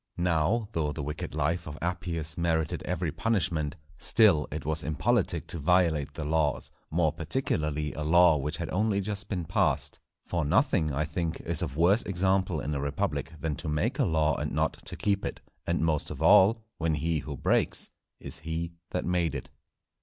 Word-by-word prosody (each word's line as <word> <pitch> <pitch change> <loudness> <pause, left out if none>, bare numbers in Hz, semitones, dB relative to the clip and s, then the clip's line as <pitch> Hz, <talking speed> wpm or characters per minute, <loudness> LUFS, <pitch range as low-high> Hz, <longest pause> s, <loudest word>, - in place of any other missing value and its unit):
Now, 90 +6 +1
though 80 -6 -1
the 75 0 -5
wicked 75 +1 -5
life 80 +3 0
of 75 0 -7
Appius 85 -2 -2
merited 80 -2 0
every 90 -2 -1
punishment, 85 -6 0 0.2
still 95 -10 +5
it 75 -1 -5
was 80 0 +1
impolitic 80 -4 0
to 85 - -1
violate 80 -3 +2
the 80 - -4
laws, 75 -1 0 0.2
more 80 -2 +1
particularly 75 - -1
a 75 - -5
law 85 +2 +5
which 75 +3 -2
had 85 -1 -4
only 105 +1 +1
just 100 0 -3
been 90 -5 -2
passed; - - 0 0.3
for 85 -2 -1
nothing, 75 +1 +2
I 75 +3 0
think, 80 +1 -3
is - - 0
of 70 - -4
worse 95 +7 +4
example 95 -2 +1
in 75 - -3
a 70 - -2
republic, 70 +2 -2
than 80 -1 -2
to 80 -1 -4
make 110 - -1
a 135 - +4
law 80 -5 +2
and - - -3
not - - -1
to - - -4
keep 100 -1 0
it; - - -4 0.3
and 85 -1 +1
most 75 -2 0
of 70 - -7
all, 105 +6 +5 0.2
when 80 -1 +1
he 80 +1 0
who 75 -2 -6
breaks - - +1 0.3
is - - -6
he 80 +1 -4 0.2
that - - -2
made 85 -4 0
it. 65 - -7
80 Hz, 185 wpm, -28 LUFS, 75-90 Hz, 0.3 s, still